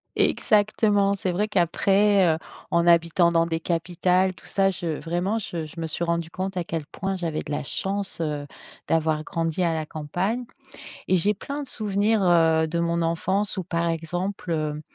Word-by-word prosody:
Exactement! 205 Hz, -2 st, +3 dB
C'est 190 Hz, -2 st, -2 dB
vrai 205 Hz, +4 st, 0 dB
qu'après, 200 Hz, +1 st, +3 dB
heu, -, -, -5 dB, 0.3 s
en 170 Hz, 0 st, +2 dB
habitant 170 Hz, 0 st, +4 dB
dans 165 Hz, 0 st, +3 dB
des 165 Hz, -1 st, -2 dB
capitales 180 Hz, +2 st, +1 dB
tout -, -, -17 dB
ça, 195 Hz, -1 st, +2 dB
je 170 Hz, -4 st, -3 dB
vraiment 175 Hz, +6 st, -1 dB
je 170 Hz, -7 st, -4 dB
je 165 Hz, -, -11 dB
me 165 Hz, -, -2 dB
suis 160 Hz, +2 st, -3 dB
rendue 170 Hz, -1 st, -1 dB
compte 185 Hz, +1 st, -4 dB
à 180 Hz, -, 0 dB
quel 165 Hz, -2 st, -4 dB
point 195 Hz, +3 st, -3 dB
j'avais 165 Hz, -4 st, -2 dB
de -, -, -8 dB
la 145 Hz, -, -1 dB
chance, 195 Hz, +6 st, -3 dB
heu, 150 Hz, -3 st, -2 dB, 0.4 s
d'avoir 155 Hz, -1 st, +1 dB
grandi 165 Hz, +2 st, -1 dB
à 170 Hz, -1 st, +2 dB
la 155 Hz, -1 st, -2 dB
campagne 180 Hz, +12 st, -2 dB, 0.6 s
et 185 Hz, -, +4 dB
j'ai 205 Hz, +5 st, +2 dB
plein 280 Hz, +8 st, -5 dB
de 275 Hz, -, -8 dB
souvenirs, 210 Hz, -1 st, +1 dB
heu, 165 Hz, -3 st, +4 dB
de 170 Hz, -, -2 dB
mon 170 Hz, 0 st, 0 dB
enfance 190 Hz, +5 st, 0 dB
où, 190 Hz, -, -3 dB
par 170 Hz, -1 st, -1 dB
exemple, 175 Hz, +3 st, -3 dB
heu, 150 Hz, -1 st, -2 dB
175 Hz, 185 wpm, -25 LUFS, 165-195 Hz, 0.6 s, habitant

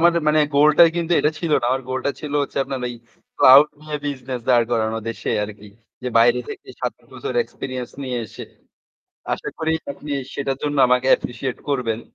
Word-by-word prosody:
আমার 170 Hz, +1 st, +5 dB, 0.2 s
মানে 155 Hz, 0 st, +4 dB
গোল 145 Hz, +2 st, +6 dB
টাই 170 Hz, -, +9 dB
কিন্তু 170 Hz, 0 st, -1 dB
এটা 150 Hz, -, +2 dB
ছিল 165 Hz, -1 st, -3 dB
না। -, -, -4 dB
আমার 130 Hz, +1 st, 0 dB
গোলটা 130 Hz, +2 st, -1 dB
ছিল 150 Hz, -2 st, -6 dB
হচ্ছে 140 Hz, -, -6 dB
আপনার 135 Hz, 0 st, -4 dB
এই 120 Hz, -, -6 dB, 0.4 s
ক্লাউড 135 Hz, +3 st, +9 dB, 0.2 s
নিয়ে 155 Hz, -1 st, -4 dB
বিজনেস 130 Hz, -3 st, -4 dB
দাঁড় 120 Hz, -2 st, +5 dB
করানো 110 Hz, -1 st, 0 dB
দেশে 115 Hz, -1 st, -4 dB
আরকি। 105 Hz, 0 st, -11 dB, 0.4 s
যে 125 Hz, -, -2 dB
বাইরে 120 Hz, +1 st, +5 dB
থেকে -, -, -9 dB
৭ -, -, -1 dB, 0.2 s
বছর -, -, -5 dB
এক্সপেরিয়েন্স 130 Hz, -2 st, -6 dB
নিয়ে 125 Hz, -2 st, -3 dB
এসে। -, -, -10 dB, 0.9 s
আশা -, -, -6 dB
করি 160 Hz, 0 st, -1 dB, 0.2 s
আপনি 145 Hz, +1 st, -9 dB, 0.2 s
সেটার 135 Hz, -1 st, -2 dB
জন্য 145 Hz, -1 st, -1 dB
আমাকে 125 Hz, +1 st, +2 dB
অ্যাপ্রিশিয়েট 125 Hz, +1 st, 0 dB
করবেন। 120 Hz, -5 st, -1 dB
130 Hz, 185 wpm, -21 LUFS, 120-145 Hz, 0.9 s, টাই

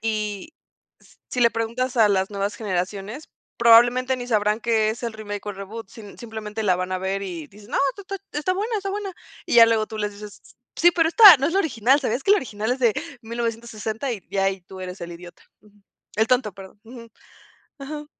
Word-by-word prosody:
Y 215 Hz, -, -3 dB, 0.5 s
s -, -, -23 dB
si 250 Hz, -, -3 dB
le 235 Hz, -1 st, +5 dB
preguntas 235 Hz, +3 st, -3 dB
a 220 Hz, -2 st, +5 dB
las 190 Hz, 0 st, +1 dB
nuevas 200 Hz, +1 st, -2 dB
generaciones, 205 Hz, -, -4 dB, 0.3 s
probablemente 240 Hz, +2 st, +5 dB
ni 245 Hz, -1 st, -6 dB
sabrán 210 Hz, 0 st, +1 dB
qué 220 Hz, -2 st, +1 dB
es 225 Hz, +3 st, -7 dB
el 235 Hz, -2 st, -3 dB
remake 205 Hz, -2 st, -7 dB
o 205 Hz, -, -3 dB
reboot. 200 Hz, +2 st, -8 dB
Sim 205 Hz, -1 st, -12 dB
simplemente 220 Hz, -1 st, -6 dB
la 185 Hz, -3 st, +2 dB
van 185 Hz, +1 st, -3 dB
a 185 Hz, -, -1 dB
ver 190 Hz, +1 st, -2 dB
y 170 Hz, -6 st, -6 dB
dicen: 205 Hz, +2 st, -16 dB
"No, -, -, 0 dB, 0.2 s
ta 400 Hz, -, -10 dB
ta 395 Hz, +1 st, -5 dB, 0.2 s
está 340 Hz, +5 st, 0 dB
buena, 430 Hz, +4 st, -2 dB
está 395 Hz, -1 st, -3 dB
buena" 400 Hz, -1 st, -4 dB, 0.3 s
y -, -, -1 dB
ya 230 Hz, -1 st, +9 dB
luego 225 Hz, -1 st, +1 dB
tú 220 Hz, -, -7 dB
les 210 Hz, -1 st, -2 dB
dices: 205 Hz, 0 st, -11 dB
"S -, -, -19 dB, 0.2 s
sí, 345 Hz, -, +5 dB
pero 330 Hz, -2 st, +2 dB
esta 405 Hz, -1 st, +10 dB
no 275 Hz, +1 st, 0 dB
es 330 Hz, -, -1 dB
la 385 Hz, -, +2 dB
original, 265 Hz, -, +2 dB
¿sabías 250 Hz, -1 st, -2 dB
que -, -, 0 dB
la 415 Hz, -, +6 dB
original 220 Hz, -, -3 dB
es 255 Hz, -, -3 dB
de 235 Hz, -4 st, +3 dB, 0.3 s
1960? 230 Hz, +1 st, -4 dB
Y 210 Hz, -5 st, -6 dB
ya 195 Hz, -1 st, 0 dB
ahí 195 Hz, -1 st, -1 dB
tú 190 Hz, +1 st, -12 dB
eres 185 Hz, 0 st, -7 dB
el 170 Hz, -, -6 dB
idiota, 175 Hz, 0 st, -13 dB, 0.2 s
ujú. 210 Hz, -1 st, -24 dB, 0.4 s
El 220 Hz, -, +3 dB
tonto, 250 Hz, -3 st, +1 dB
perdón, 195 Hz, +2 st, -13 dB
ujú. 230 Hz, 0 st, -12 dB, 0.7 s
Ajá. 295 Hz, +2 st, -7 dB
220 Hz, 220 wpm, -23 LUFS, 205-255 Hz, 0.7 s, esta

